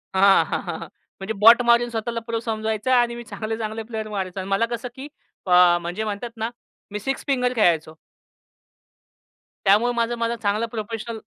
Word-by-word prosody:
हां, 195 0 +5
हां, - - -3
हां. - - -5 0.4
म्हणजे 195 +3 -4
बॉट 225 +4 +7
मारून 235 0 +4
स्वतःला 230 +1 -3
प्रो 230 -1 -1
समजवायचा 220 +2 -1
आणि 240 -1 +2
मी 240 - -7
चांगले-चांगले 220 0 -4
प्लेयर 220 -1 -5
मारायचा 190 -2 -4
आणि 190 - -7
मला 195 +4 +2
कसं, 235 +2 -7
की 270 +2 -8 0.4
अ, 180 -1 +6
म्हणजे 175 +6 -4
म्हणतात 215 +3 -4
ना, 225 +1 -2 0.4
मी 210 - -4
सिक्स 270 +6 -3
फिंगर 250 -2 +1
खेळायचो. 165 -7 +2 1.7
त्यामुळे 215 +5 +4
माझा 235 0 0
माझा 230 0 -1
चांगला 210 +3 0
प्रोफेशनल 225 +1 -5
220 Hz, 165 wpm, -23 LUFS, 205-235 Hz, 1.7 s, बॉट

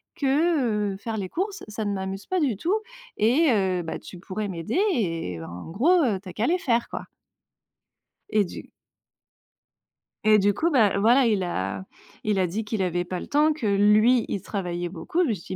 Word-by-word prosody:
que, 270 -8 +1
heu, - - -7
faire 225 +3 -5
les 195 -4 -4
courses, 395 - -3
ça 215 0 -4
ne 205 - -1
m'amuse 190 +1 -4
pas 370 -1 0
du 255 -9 +1
tout 350 - 0 0.4
et 265 +9 +3
heu, 190 -4 +1
bah 160 - -5
tu 180 - -11
pourrais 200 +3 -4
m'aider, 175 - -2
et 165 - -2
en 85 - -8
gros 335 - +4 0.2
tu 200 - -14
as - - -9
qu'à 215 +6 0
les 355 - +2
faire 235 -6 0
quoi». - - -5 1.3
Et 210 -1 +2
du - - -10 1.5
et 215 0 +6
du 205 0 +3
coup 320 - +1
bah 220 - +3
voilà, 245 +5 +5
il 215 -4 +2
a 95 - -3 0.4
il 210 -2 0
a 185 - +3
dit 195 +6 -3
qu'il 210 -2 -2
avait 175 -1 -1
pas 180 0 -4
le - - -7
temps, 300 +2 +3
que 295 -6 -6
lui 210 +4 +4
il 195 - -3
travaillait 175 -3 -3
beaucoup, 190 - -1
je 320 - 0
me - - +2
suis 190 -1 -7
210 Hz, 195 wpm, -25 LUFS, 185-250 Hz, 1.5 s, et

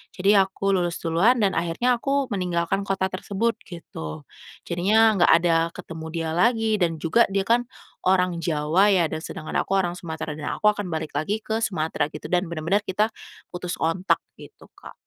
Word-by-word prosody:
Jadi 200 +2 +4
aku 195 +1 0
lulus 175 -1 -1
duluan 180 +10 +3
dan 195 - +2
akhirnya 240 +9 0
aku 275 0 0
meninggalkan 180 +1 -1
kota 190 -1 0
tersebut 205 +5 -2
gitu, 80 - -8 0.5
jadinya 210 +5 +3
nggak - - +6
ada 170 -1 +3 0.2
ketemu 160 -1 -8
dia 165 -1 -2
lagi 225 +2 +2
dan 165 -2 +1
juga 230 +9 +4
dia 195 - +2
kan 240 +1 +3 0.4
orang 180 -2 +2
Jawa 165 +5 +2
ya 175 -3 +3
dan 155 - -3
sedangkan 155 - -7
aku - - -11
orang 175 -2 -1
Sumatera 160 -3 -5
dan 145 - -4
aku 210 - +3
akan 205 -1 -5
balik 160 -2 -4
lagi 200 +9 -1
ke 220 0 -2
Sumatera 155 -5 -2
gitu 155 - -7
dan 180 +1 +1
bener-bener 170 +5 0
kita 210 +3 +1 0.4
putus 180 0 -5
kontak 170 +4 +1 0.2
gitu, - - -15
Kak. - - -12
180 Hz, 175 wpm, -24 LUFS, 165-205 Hz, 0.5 s, nggak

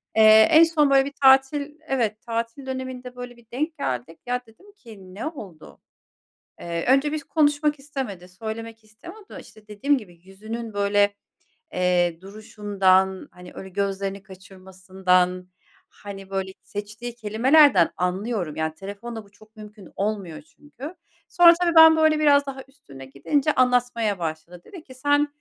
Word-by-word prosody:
Eee, 220 0 +7
en 320 0 +8
son, 320 -3 +2
böyle, 270 -1 +4
bir 280 - -7
tatil 275 +3 +3
Evet, 225 -5 -1
tatil 230 +3 -5
döneminde, 260 -1 -7
böyle, 245 -1 -9
bir 235 - -21
denk 310 +5 -3
geldik. 130 +5 -4
Ya, 250 0 -2
dedim 360 - -20
ki, 215 - -15
“Ne 220 - -6
oldu?” 205 - -10 0.8
Eee, 170 -1 -4
önce 275 +3 +2
biz 305 -2 -4
konuşmak 295 -1 +1
istemedi, 260 -11 -7
söylemek 225 +3 -8
istemiyor 345 - -14
da, - - -10
işte, 215 -1 -18
dediğim 275 +8 0
gibi, 185 -7 -14
yüzünün, 220 +4 -8
böyle, 205 0 +1 0.6
eee, 180 -2 +1
duruşundan, 195 -2 0
hani, 180 0 -14
öyle 190 - -9
gözlerini 195 0 -3
kaçırmasından, 185 -1 -2 0.4
hani, 195 -1 -11
böyle, 190 -1 -3
seçtiği 220 +4 -8
kelimelerden 240 - +4
anlıyorum. 180 -2 -3
Yani, 160 0 -2
telefonla 205 +6 -8
bu 200 - -22
çok 215 +2 -22
mümkün 210 -3 -13
olmuyor 200 -5 -4
çünkü. 295 0 -12 0.3
Sonra 345 -1 +7
tabii 340 -1 +1
ben 320 0 +9
böyle 315 -1 +3
biraz 285 -2 +4
daha 270 -1 -7
üstüne 140 - -14
gidince 265 - -1
anlatmaya 245 -5 +1
başladı. 165 +1 -6
Dedi 360 -5 -12
ki, 260 -4 -15
“Sen, 290 +3 +1
220 Hz, 145 wpm, -23 LUFS, 190-275 Hz, 0.8 s, ben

